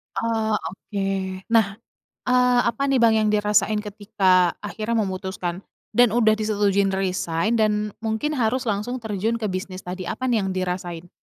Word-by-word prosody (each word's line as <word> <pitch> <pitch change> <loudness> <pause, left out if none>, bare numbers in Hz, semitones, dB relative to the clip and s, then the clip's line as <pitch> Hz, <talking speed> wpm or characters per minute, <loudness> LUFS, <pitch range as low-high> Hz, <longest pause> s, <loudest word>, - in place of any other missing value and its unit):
Oh, 220 -2 0
oke. 190 +1 -4
Nah, 215 -4 +3 0.5
eee, 250 -1 +3
apa 275 +4 0
nih 275 - +2
Bang 235 -2 +5
yang 220 -1 +2
dirasain 210 0 +2
ketika 195 -4 +2
akhirnya 215 +3 -3
memutuskan, 185 -2 -4 0.3
dan 235 0 +4
udah 220 -2 +4
disetujuin 200 -2 +1
resign 190 +3 0
dan 210 -1 +1
mungkin 220 +7 -2
harus 250 +3 +1
langsung 230 +3 -2
terjun 220 +2 -1
ke 215 -4 -2
bisnis 185 0 -5
tadi? 180 0 -6
Apa 255 +5 -2
nih 230 - +3
yang 190 -1 -3
dirasain? 180 -2 -4
210 Hz, 150 wpm, -23 LUFS, 190-225 Hz, 0.5 s, Bang